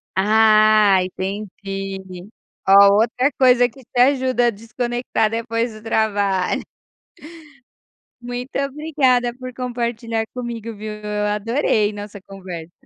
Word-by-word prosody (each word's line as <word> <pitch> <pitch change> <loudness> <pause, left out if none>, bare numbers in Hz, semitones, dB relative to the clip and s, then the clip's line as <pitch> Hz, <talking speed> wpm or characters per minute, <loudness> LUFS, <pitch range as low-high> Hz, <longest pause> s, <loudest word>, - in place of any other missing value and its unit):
Ah, 215 -1 +5
entendi. 195 -1 -6 0.4
Ó, 200 +1 +7
outra 245 +6 +2
coisa 250 -2 +5
que 260 +3 -16
te 245 - -2
ajuda 255 -2 +3
a - - +2
desconectar 240 +1 -2
depois 230 0 -2
do 215 - -12
trabalho. 205 -4 0 1.6
Muito 245 +2 -5
obrigada 275 -4 0
por 255 0 -9
compartilhar 235 -2 -3
comigo, 235 -2 -6
viu, 215 +1 -6
eu 210 0 -3
adorei 215 0 0
nossa 205 -1 -9
conversa. 180 -4 -9
220 Hz, 105 wpm, -20 LUFS, 205-245 Hz, 1.6 s, Ó